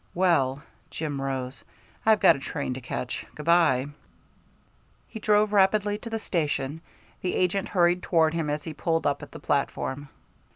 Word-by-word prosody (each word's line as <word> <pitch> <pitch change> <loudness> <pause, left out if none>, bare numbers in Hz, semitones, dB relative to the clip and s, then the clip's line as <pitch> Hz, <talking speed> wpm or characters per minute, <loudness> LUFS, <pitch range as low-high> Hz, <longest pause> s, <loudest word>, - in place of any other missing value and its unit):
"Well," 150 -7 +2 0.3
Jim 145 -3 -4
rose, 135 -1 -4 0.4
"I've 220 -1 +6
got - - +6
a - - -7
train 140 -1 -3
to 130 - -7
catch. 125 0 -4
Good 150 - -8
by." 165 -7 +4 1.2
He 220 - -8
drove 210 0 +3
rapidly 205 +1 +3
to 230 - -8
the 225 - -2
station; 155 -6 -2 0.4
the 180 - -1
agent 185 +2 0
hurried 175 -1 +3
toward 160 -3 +2
him 165 -3 -1
as 150 0 -2
he 160 - -6
pulled 165 +2 -1
up 140 0 0
at - - -10
the - - -9
platform. 140 0 -2
160 Hz, 165 wpm, -26 LUFS, 140-185 Hz, 1.2 s, I've